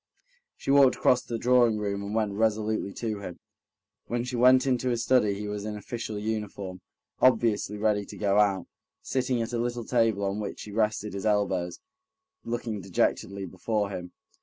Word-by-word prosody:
She -, -, -2 dB
walked 140 Hz, -2 st, +6 dB
across 125 Hz, -1 st, +3 dB
the 115 Hz, -, -4 dB
drawing 120 Hz, -2 st, +4 dB
room 100 Hz, -1 st, -2 dB
and 100 Hz, +2 st, -4 dB
went 110 Hz, -2 st, +1 dB
resolutely 110 Hz, -1 st, 0 dB
to 110 Hz, -3 st, -3 dB
him. 90 Hz, -3 st, -7 dB, 0.7 s
When 120 Hz, +1 st, -1 dB
she 125 Hz, 0 st, -4 dB
went 130 Hz, +2 st, +5 dB
into 130 Hz, -1 st, +1 dB
his 120 Hz, -2 st, 0 dB
study 105 Hz, -6 st, +3 dB
he 105 Hz, +1 st, -5 dB
was 105 Hz, 0 st, -4 dB
in 105 Hz, 0 st, -4 dB
official 110 Hz, 0 st, -5 dB
uniform, 105 Hz, -3 st, -4 dB, 0.4 s
obviously 110 Hz, -4 st, +3 dB
ready 105 Hz, -1 st, +1 dB
to -, -, -10 dB
go 100 Hz, 0 st, +2 dB
out, 100 Hz, -4 st, +2 dB, 0.4 s
sitting 125 Hz, -2 st, 0 dB
at 115 Hz, -, -6 dB
a 120 Hz, -, 0 dB
little 120 Hz, -1 st, -2 dB
table 115 Hz, -4 st, +2 dB
on 100 Hz, +2 st, -2 dB
which 105 Hz, -, -5 dB
he 105 Hz, -, -9 dB
rested 105 Hz, -1 st, 0 dB
his 100 Hz, +1 st, -2 dB
elbows, 95 Hz, -4 st, 0 dB, 0.6 s
looking 115 Hz, -3 st, -3 dB
dejectedly 95 Hz, +1 st, -1 dB
before 100 Hz, +3 st, -2 dB
him. 90 Hz, -2 st, -6 dB
105 Hz, 175 wpm, -27 LUFS, 100-120 Hz, 0.7 s, walked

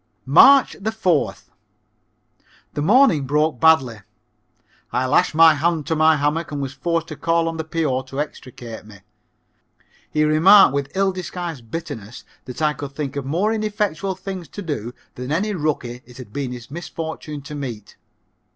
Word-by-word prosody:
March 270 Hz, -, +6 dB
4th. 200 Hz, -6 st, -1 dB, 1.2 s
The 145 Hz, -, -3 dB
morning 190 Hz, -, +4 dB
broke 150 Hz, -1 st, +1 dB
badly. 135 Hz, -8 st, +4 dB, 0.9 s
I 130 Hz, -, 0 dB
lashed 130 Hz, -, +2 dB
my 165 Hz, 0 st, +7 dB
hand 160 Hz, 0 st, 0 dB
to 160 Hz, -, -1 dB
my 155 Hz, 0 st, +4 dB
hammock 150 Hz, +3 st, -1 dB
and 145 Hz, -, -4 dB
was 135 Hz, -1 st, -4 dB
forced 165 Hz, +3 st, -2 dB
to 155 Hz, -, -6 dB
call 165 Hz, +3 st, 0 dB
on 165 Hz, 0 st, -3 dB
the 160 Hz, -, -3 dB
P.O. 155 Hz, -5 st, -1 dB
to 135 Hz, +1 st, -7 dB
extricate 125 Hz, -6 st, -7 dB
me. 105 Hz, -3 st, -15 dB, 1.1 s
He 155 Hz, -, +1 dB
remarked, 160 Hz, +2 st, +6 dB
with 140 Hz, -1 st, -2 dB
ill 195 Hz, 0 st, +2 dB
disguised 175 Hz, -9 st, -6 dB
bitterness, 120 Hz, -7 st, -7 dB, 0.2 s
that 125 Hz, +4 st, -6 dB
I 150 Hz, -1 st, +2 dB
could 140 Hz, -2 st, -8 dB
think 140 Hz, -2 st, -5 dB
of 140 Hz, -2 st, -4 dB
more 185 Hz, +10 st, 0 dB
ineffectual 205 Hz, -4 st, -2 dB
things 190 Hz, -2 st, -7 dB
to 205 Hz, +9 st, -8 dB
do 140 Hz, -9 st, -4 dB, 0.2 s
than 125 Hz, +2 st, -6 dB
any 200 Hz, +7 st, 0 dB
rookie 145 Hz, -7 st, -3 dB
it 125 Hz, 0 st, -15 dB
had 120 Hz, -5 st, -11 dB
been 140 Hz, -3 st, -3 dB
his 125 Hz, 0 st, -9 dB
misfortune 160 Hz, -2 st, -6 dB
to 145 Hz, -, -9 dB
meet. 120 Hz, -8 st, -7 dB
155 Hz, 160 wpm, -21 LUFS, 135-170 Hz, 1.2 s, my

